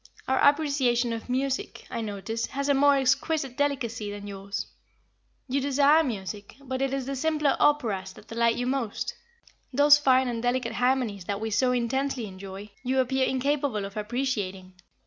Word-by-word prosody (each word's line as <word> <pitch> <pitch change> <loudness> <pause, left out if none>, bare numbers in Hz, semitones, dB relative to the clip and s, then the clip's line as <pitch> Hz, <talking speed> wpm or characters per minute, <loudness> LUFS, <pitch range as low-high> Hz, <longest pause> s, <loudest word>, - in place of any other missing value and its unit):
"Our 265 - +2
appreciation 275 -5 +3
of 230 +2 -6
music, 265 +1 -2
I 230 - -3
notice, 220 +2 -3
has 280 +1 -3
a - - +5
more 285 +1 +5
exquisite 270 0 +1
delicacy 250 -7 -1
than 205 0 -7
yours. 200 0 -5 0.8
You 275 +2 0
desire 285 +3 +4
music, 205 -5 -5
but 260 -1 -4
it 270 -1 +1
is 270 -1 -2
the 275 +1 -3
simpler 300 0 +1
operas 215 -10 +2
that 215 - -16
delight 230 0 +2
you 245 - -2
most. 250 -5 -2 0.6
Those 290 +2 +6
fine 260 -2 +4
and 235 -2 -2
delicate 245 -1 0
harmonies 245 -6 0
that 200 +1 -2
we 220 0 -3
so 250 +5 +2
intensely 250 +1 -1
enjoy, 195 +1 -9
you 260 +1 0
appear 260 +1 +2
incapable 265 -5 0
of 195 - -9
appreciating." 210 -5 -3
250 Hz, 165 wpm, -27 LUFS, 215-275 Hz, 0.8 s, Those